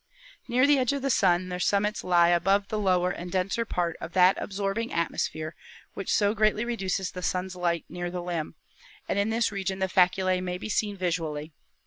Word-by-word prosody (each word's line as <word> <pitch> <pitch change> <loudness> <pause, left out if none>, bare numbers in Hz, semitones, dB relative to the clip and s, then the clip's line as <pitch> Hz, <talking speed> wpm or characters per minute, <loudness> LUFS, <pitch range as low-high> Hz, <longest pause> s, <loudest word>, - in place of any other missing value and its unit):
"Near 250 +2 +3
the 285 -1 +4
edge 255 +1 +1
of 280 -1 -3
the 275 - +1
Sun 185 -3 +2
their 180 0 -4
summits 205 +3 +1
lie 175 -1 +4
above 195 +4 +2
the 215 - -2
lower 180 -3 +2
and 175 0 -6
denser 195 +5 0
part 175 -5 -2
of 170 - -7
that 185 +1 +5
absorbing 200 +3 -2
atmosphere 155 -1 -2 0.4
which 195 - -4
so 205 0 +3
greatly 215 +1 +2
reduces 195 -5 -2
the 180 - -7
Sun's 185 0 -2
light 170 -2 -1
near 175 +1 -5
the 175 0 -5
limb, 170 -3 -4 0.5
and 200 - 0
in 200 +2 +1
this 230 0 +1
region 195 -1 -3
the 190 0 0
faculse 185 0 +2
may 180 -1 -3
be 215 - -7
seen 205 -1 -1
visually. 160 -4 -3
185 Hz, 195 wpm, -27 LUFS, 175-205 Hz, 0.5 s, that